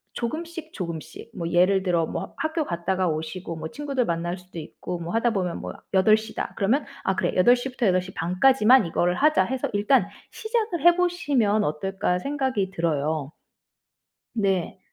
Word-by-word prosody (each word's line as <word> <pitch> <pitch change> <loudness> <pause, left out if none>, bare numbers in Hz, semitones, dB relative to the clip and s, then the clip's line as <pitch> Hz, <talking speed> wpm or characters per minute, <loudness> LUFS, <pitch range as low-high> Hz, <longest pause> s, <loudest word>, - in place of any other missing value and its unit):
조금씩 320 +6 -5
조금씩 170 -4 -7
뭐 170 -1 -3
예를 185 +2 +4
들어 175 -3 +1
뭐 - - -6
학교 315 -1 -1
갔다가 180 +2 -1
오시고 160 +2 -4
뭐 160 0 -6
친구들 275 - -2
만날 170 +2 -2
수도 180 -2 -10
있고 170 +3 -6
뭐 170 0 -5
하다 230 +1 +2
보면 185 -4 -2
뭐 - - -6 0.2
8:00 215 +3 +3
다. - - -3
그러면 235 +9 +1 0.2
'아 190 - +1
그래, 190 - 0
8:00 245 +7 +4
부터 240 -4 0
8:30 185 -1 -1
까지만 260 -3 +6
이거를 175 +2 +1
하자.' 300 -9 +3
해서 260 +4 -2
'일단 210 +6 +3 0.3
시작을 440 - -2
해 345 0 +8
보시면 285 - +1
어떨까?' 180 +3 -1
생각이 265 -6 -1
들어요. 155 -3 -1 1.0
네. 195 -5 0
195 Hz, 300 characters per minute, -25 LUFS, 175-265 Hz, 1.0 s, 해